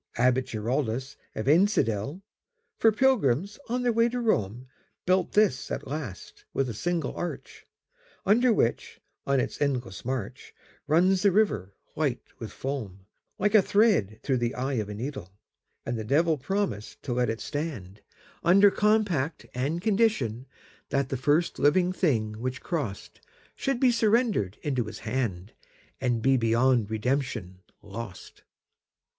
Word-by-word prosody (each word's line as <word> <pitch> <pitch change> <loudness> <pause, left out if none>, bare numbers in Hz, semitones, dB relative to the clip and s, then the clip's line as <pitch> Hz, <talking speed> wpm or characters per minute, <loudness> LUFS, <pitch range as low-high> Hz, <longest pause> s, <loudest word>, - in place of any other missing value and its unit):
Abbot 125 +2 +2
Giraldus 120 +3 -2 0.2
of 110 - -3
Einsiedel, 150 - +2 0.6
For 225 - +5
pilgrims 205 - +2
on 250 +1 -1
their 240 -1 +2
way 230 +1 +3
to 245 +1 -3
Rome, 120 - 0 0.4
Built 185 0 +2
this 210 -11 +2
at - - -4
last, 135 -9 -7
with 135 - +1
a - - -4
single 170 +5 -2
arch, 175 - -6 0.6
Under 235 +5 +4
which, 120 - 0 0.3
on 140 -1 +3
its - - -3
endless 125 -10 -1
march, 130 -4 -5 0.3
Runs 180 +5 +3
the 200 -1 +4
river, 110 - +1 0.2
white 140 -6 -1 0.2
with 115 - -6
foam, 110 -9 -5 0.3
Like 210 +2 +1
a 215 - +8
thread 190 - +2
through 135 -2 +1
the 120 +2 -1
eye 130 +2 -2
of 105 - -6
a 105 - -5
needle. 115 -6 -6 0.5
And 120 -1 -2
the - - -3
Devil 155 +8 +2
promised 130 - -3
to 130 - -2
let 125 -1 +1
it 110 0 -2
stand, 130 - -5 0.4
Under 195 +3 +6
compact 200 -10 +1
and 145 +8 -2
conditionThat 140 - -1
the - - -1
first 150 +6 +1
living 180 +5 +3
thing 110 - 0
which 130 +3 -4
crossedShould 165 - -5
be 255 -1 +5
surrendered 220 - +1
into 130 -5 0
his 110 - -7
hand, 110 -5 -2 0.5
And 120 -3 0
be 135 0 +4
beyond 115 -1 +2
redemption 110 -5 -2 0.2
lost. 105 -1 -9
135 Hz, 140 wpm, -27 LUFS, 115-185 Hz, 0.6 s, a